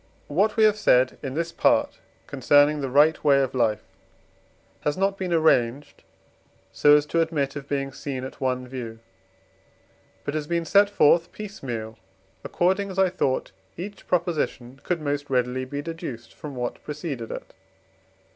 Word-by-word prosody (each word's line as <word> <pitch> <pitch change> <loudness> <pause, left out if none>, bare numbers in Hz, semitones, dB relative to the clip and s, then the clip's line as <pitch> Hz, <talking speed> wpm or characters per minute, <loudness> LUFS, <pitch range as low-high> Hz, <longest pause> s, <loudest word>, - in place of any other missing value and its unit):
What 200 +9 +2
have 215 -2 +4
said 130 -11 +3
in 135 -2 -5
this 165 +1 -2
Part - - +2 0.3
concerning 145 +2 +3
the 135 - -2
right 150 +4 +4
way 140 -2 +5
of 130 - -3
life 115 -5 +1 1.0
has 150 - -1
not 195 +1 +1
been 185 -2 -4
arranged, 145 -5 +1 0.7
so 145 +10 +5
as 145 - 0
to 165 +2 +1
admit 150 -4 -1
of 140 -1 -8
being 140 -1 -2
seen 135 -2 -5
at 130 - -9
one 130 -1 -1
view, 120 -3 -7 1.3
but 145 - -3
has 155 -1 -3
been 170 0 -1
set 200 +3 +4
forth 170 -3 +3
piece 210 0 -9
meal, 110 -4 -5 0.4
according 190 +3 0
as 190 - -8
I 190 -1 +4
thought 140 -7 -1 0.3
each 200 +4 -8
Proposition 150 -7 -2
could 175 -3 -2
most 145 -1 -3
readily 125 0 0
be 145 +2 -5
deduced 145 -8 -7
from 145 -3 -9
what 125 -1 -4
preceded 145 -6 -5
it. - - -8
145 Hz, 155 wpm, -25 LUFS, 130-170 Hz, 1.3 s, way